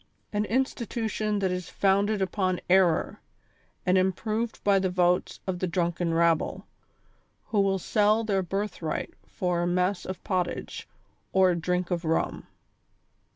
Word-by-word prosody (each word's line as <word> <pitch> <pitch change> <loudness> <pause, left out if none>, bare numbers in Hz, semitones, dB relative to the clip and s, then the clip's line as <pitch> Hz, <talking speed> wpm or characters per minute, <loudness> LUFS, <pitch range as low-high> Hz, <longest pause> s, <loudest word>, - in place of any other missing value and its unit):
An 210 0 +1
institution 225 -3 -1
that 190 -2 0
is 180 -1 -4
founded 200 +1 +2
upon 185 -1 0
error, 180 -4 +3 0.7
and 185 +1 +4
improved 215 +5 -1
by 200 -1 +4
the 190 -1 0
votes 180 0 +1
of 185 -2 -2
the 185 - 0
drunken 170 0 0
rabble, 165 -1 +1 0.8
who 215 - 0
will 195 -1 +2
sell 210 +4 +2
their 200 -3 +1
birthright 185 -3 -3
for 180 -2 -1
a 175 - 0
mess 180 +2 0
of 185 -1 -6
pottage, 180 -2 -3 0.5
or 190 -1 +5
a - - 0
drink 180 +1 -1
of 175 -1 -1
rum. 160 0 -1
185 Hz, 140 wpm, -27 LUFS, 180-205 Hz, 0.8 s, or